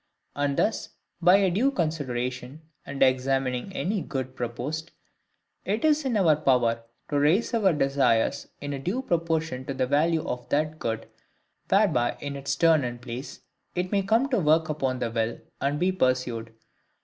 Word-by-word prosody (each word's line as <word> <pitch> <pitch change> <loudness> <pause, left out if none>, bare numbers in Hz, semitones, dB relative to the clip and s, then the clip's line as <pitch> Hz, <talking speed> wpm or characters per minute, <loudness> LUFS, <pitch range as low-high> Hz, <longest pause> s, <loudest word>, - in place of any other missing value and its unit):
And 140 -1 0
thus, 220 - 0 0.3
by 180 +2 +7
a 195 -2 +3
due 230 +10 +2
consideration, 135 - -3 0.2
and 140 -1 +1
examining 130 +3 +1
any 195 +2 -1
good 130 -3 -4
proposed, 130 +8 -4 0.7
it 215 +8 -1
is 305 -1 +3
in 245 -4 +1
our 165 -6 +5
power 125 -5 +2 0.3
to 145 - +2
raise 170 +12 +2
our 210 -5 +4
desires 135 -6 +1
in 145 0 -4
a 140 - -4
due 200 - -2
proportion 160 - -1
to 135 - -4
the 130 - +1
value 155 +4 +1
of 125 0 -5
that 155 +2 0
good, 115 -1 -3 0.6
whereby 185 - +2
in 145 -1 -5
its 140 0 -2
turn 160 -1 +4
and 120 0 -4
place 125 +2 -7 0.3
it 180 0 -2
may 200 -1 +2
come 225 +7 +2
to 250 -5 +2
work 155 -1 +3
upon 135 -4 -1
the 120 -2 -2
will, 115 0 -1 0.2
and 140 +2 0
be 180 +2 +2
pursued. 130 -8 0
145 Hz, 165 wpm, -26 LUFS, 130-175 Hz, 0.7 s, by